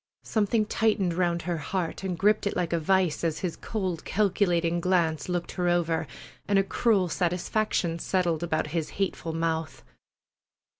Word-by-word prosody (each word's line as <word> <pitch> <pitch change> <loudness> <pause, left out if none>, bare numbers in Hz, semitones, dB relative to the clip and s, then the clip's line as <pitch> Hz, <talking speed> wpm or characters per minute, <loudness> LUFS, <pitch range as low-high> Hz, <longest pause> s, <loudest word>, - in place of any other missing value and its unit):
Something 215 0 +1
tightened 210 -5 +1
round 170 -1 0
her 175 0 -1
heart 170 +3 -3
and 185 -2 -2
gripped 210 +2 +3
it - - -2
like 175 -2 -1
a 170 - +2
vise 180 -1 +1
as 160 -2 -1
his 170 - -2
cold 185 -7 -3
calculating 175 -4 +1
glance 170 -3 +1
looked 175 -1 -2
her 180 -1 0
over, 170 -2 +1 0.4
and 200 0 +3
a 195 - +4
cruel 200 -2 +2
satisfaction 175 0 0
settled 175 -4 0
about 160 -2 0
his 165 -3 -1
hateful 190 -4 -1
mouth. 165 -1 -2
175 Hz, 155 wpm, -27 LUFS, 165-195 Hz, 0.4 s, a